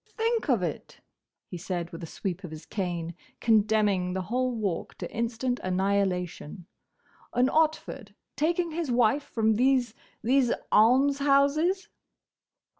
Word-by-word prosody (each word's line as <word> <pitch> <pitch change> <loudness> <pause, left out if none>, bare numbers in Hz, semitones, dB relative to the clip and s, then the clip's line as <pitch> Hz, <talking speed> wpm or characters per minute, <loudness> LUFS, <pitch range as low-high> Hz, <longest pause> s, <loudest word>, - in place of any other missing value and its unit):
"Think 455 -4 0
of 235 -8 +2
it!" 165 -4 -5 0.5
he 180 - -8
said 175 -1 -4
with 165 - -8
a 165 - -6
sweep 185 +3 -5
of 180 - -6
his 155 0 -10
cane 175 -4 -3 0.3
condemning 210 -4 +2
the 190 0 -2
whole 255 +5 -1
Walk 200 -7 -3
to - - -6
instant 235 +2 -1
annihilation. 185 -2 -1 0.7
"An 250 +2 +3
Otford 285 -9 -1 0.2
taking 335 +4 0
his 325 -2 -3
wife 245 +3 +3
from 220 -5 0
these—these—Almshouses!" 275 - +2
225 Hz, 115 wpm, -27 LUFS, 185-275 Hz, 0.7 s, An